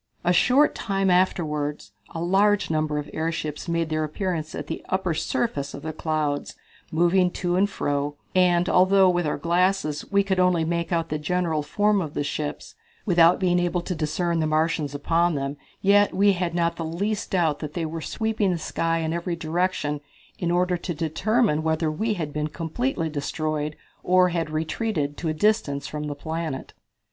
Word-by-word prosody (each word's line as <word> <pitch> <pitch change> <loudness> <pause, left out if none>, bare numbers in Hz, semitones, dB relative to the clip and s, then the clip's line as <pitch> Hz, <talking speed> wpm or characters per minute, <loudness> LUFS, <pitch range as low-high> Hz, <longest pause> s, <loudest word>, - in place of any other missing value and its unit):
A 175 0 +3
short 255 +10 +4
time 195 -2 0
afterward 150 -5 +1 0.3
a 165 - -4
large 200 +2 +3
number 155 -1 0
of 150 0 -3
airships 160 -1 -3
made 170 -1 0
their 155 0 0
appearance 155 0 -3
at - - -5
the 160 - -5
upper 190 -2 0
surface 150 -2 -2
of - - -9
the 160 0 -4
clouds, 155 -2 -2 0.4
moving 175 +3 +3
to 175 -1 -1
and 200 +2 +3
fro, 145 -5 -2 0.2
and 180 -1 +3
although, 185 +1 +5
with 175 -2 0
our - - -1
glasses, 170 -1 +1
we 200 0 +4
could 190 -1 0
only 180 -3 +3
make 170 0 -2
out 165 -1 0
the 155 - -2
general 165 0 0
form 205 +6 +1
of 155 -4 -5
the - - 0
ships, 145 +1 -4 0.3
without 175 -3 +5
being 180 -2 +2
able 175 0 0
to 180 - -3
discern 165 +1 -1
the 155 - +1
Martians 155 -2 0
upon 165 +3 +1
them, 140 0 -2 0.3
yet 205 0 +4
we 200 +2 +5
had 175 -2 -2
not 170 -1 +1
the 165 - -3
least 200 +6 -2
doubt 165 -6 +1
but 150 -2 -6
they 165 0 -2
were 160 +1 -5
sweeping 220 +2 -1
the 180 - 0
sky 165 +1 -1
in 160 0 -1
every 170 0 -2
direction 160 -3 -1 0.4
in 175 - -1
order 180 +1 +2
to 175 0 -4
determine 165 +3 +1
whether 160 0 0
we 215 +7 -1
had 155 -5 -4
been 150 0 -1
completely 165 - -2
destroyed 150 0 -2 0.3
or 185 0 +4
had 165 -2 -2
retreated 155 -1 -2
to 165 - -3
a - - 0
distance 155 -7 +1
from 150 0 -4
the 145 -1 -4
planet. 160 -1 -5
170 Hz, 185 wpm, -24 LUFS, 155-185 Hz, 0.4 s, although